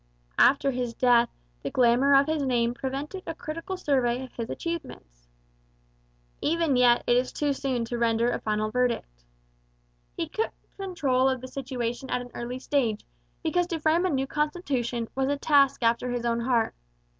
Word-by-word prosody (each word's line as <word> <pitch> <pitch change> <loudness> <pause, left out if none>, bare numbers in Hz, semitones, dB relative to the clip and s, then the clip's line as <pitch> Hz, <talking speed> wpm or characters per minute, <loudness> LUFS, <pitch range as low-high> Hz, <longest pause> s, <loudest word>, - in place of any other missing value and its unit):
After 275 +1 +5
his 245 -2 -3
death 240 -1 +4 0.3
the - - -3
glamour 255 +3 +4
of 275 +1 +6
his 315 0 -1
name 240 -3 +1
prevented 275 +9 -4
a 330 - -4
critical 330 +5 -5
survey 260 -6 +1
of 260 - -11
his 230 -1 -5
achievements. - - -6 1.1
Even 325 -3 +1
yet 245 -1 +5
it 240 - +3
is 250 +1 0
too 290 -1 0
soon 260 -4 -2
to 235 +1 -4
render 235 +1 +2
a - - -2
final 215 0 -1
verdict. 235 - -1 0.9
He - - -2
took 445 - -2 0.2
control 280 -10 +1
of 260 -1 -1
the 255 - -8
situation 255 -1 -4
at - - 0
an 245 0 -10
early 240 +1 -5
stage, 250 -5 -1 0.4
because 345 +2 +1
to 335 -3 -3
frame 320 +4 +2
a - - -1
new 270 -4 0
constitution 270 -6 -2
was 265 0 0
a 285 - 0
task 280 -3 +3
after 235 +2 +2
his 245 -1 -2
own 235 0 +1
heart. 235 -1 +1
255 Hz, 170 wpm, -27 LUFS, 235-290 Hz, 1.1 s, of